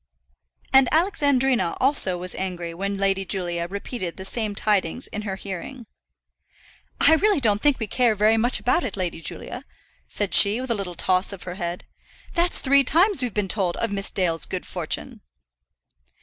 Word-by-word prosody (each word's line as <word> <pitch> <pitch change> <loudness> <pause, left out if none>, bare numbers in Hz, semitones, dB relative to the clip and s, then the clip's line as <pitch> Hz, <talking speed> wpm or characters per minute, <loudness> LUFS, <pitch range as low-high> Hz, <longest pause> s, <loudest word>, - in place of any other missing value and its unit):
And 265 -1 +6
Alexandrina 270 - +1
also 255 -9 +3
was 180 +1 -2
angry 175 -3 -4
when 195 +3 -3
Lady 195 0 0
Julia 175 -3 -3
repeated 200 -1 -5
the 190 - -7
same 215 0 -1
tidings 205 +2 0
in 215 - -5
her 200 -2 -4
hearing. 200 +7 -7 1.1
"I - - +6
really 405 +2 +3
don't 210 -5 +2
think 290 -2 +3
we 220 - -2
care 235 +1 +1
very 215 +2 +3
much 240 +3 +1
about 285 +7 +1
it, 210 - -4
Lady 175 -3 -3
Julia," - - -6 0.4
said 205 -2 -3
she, 205 +3 +6
with 260 -1 -4
a - - +1
little 190 -4 -5
toss 185 +3 +1
of 195 -2 -8
her 180 - -6
head. 175 -2 -5 0.5
"That's 345 -1 +2
three 275 0 +4
times 350 +5 +3
we've 250 -2 -1
been 210 -2 0
told 185 -3 -1
of 230 - -2
Miss 200 0 -2
Dale's 170 -5 -1
good 185 - -5
fortune." 205 +7 -5
205 Hz, 175 wpm, -23 LUFS, 185-255 Hz, 1.1 s, And